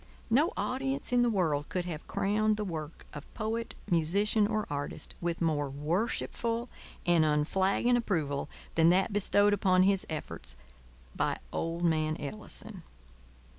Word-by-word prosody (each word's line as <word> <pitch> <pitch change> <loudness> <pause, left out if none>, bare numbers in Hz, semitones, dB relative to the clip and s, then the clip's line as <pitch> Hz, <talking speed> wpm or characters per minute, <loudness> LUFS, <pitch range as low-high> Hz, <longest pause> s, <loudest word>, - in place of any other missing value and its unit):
No 300 - +4
audience 270 0 -2
in 245 - +5
the 240 - +4
world 160 -9 0
could 180 -1 -2
have 165 -3 -6
crowned 210 +2 +1
the 210 - -2
work 160 -4 -6
of 145 0 -9
poet, 225 +1 -3
musician, 200 +6 +2
or 215 0 -1
artist 145 0 -3
with 170 0 -2
more 150 -4 +1
worshipful 225 - -1 0.4
and 175 -2 +4
unflagging 190 +10 +2
approval 160 -12 -1 0.2
than 165 0 +5
that 190 +4 +3
bestowed 205 0 +4
upon 185 -2 +4
his 195 0 +2
efforts 65 - -5 0.6
by - - 0 0.2
old 165 +1 -2
man 155 -2 +1
Ellison. 205 +4 -7
185 Hz, 135 wpm, -30 LUFS, 155-215 Hz, 0.6 s, in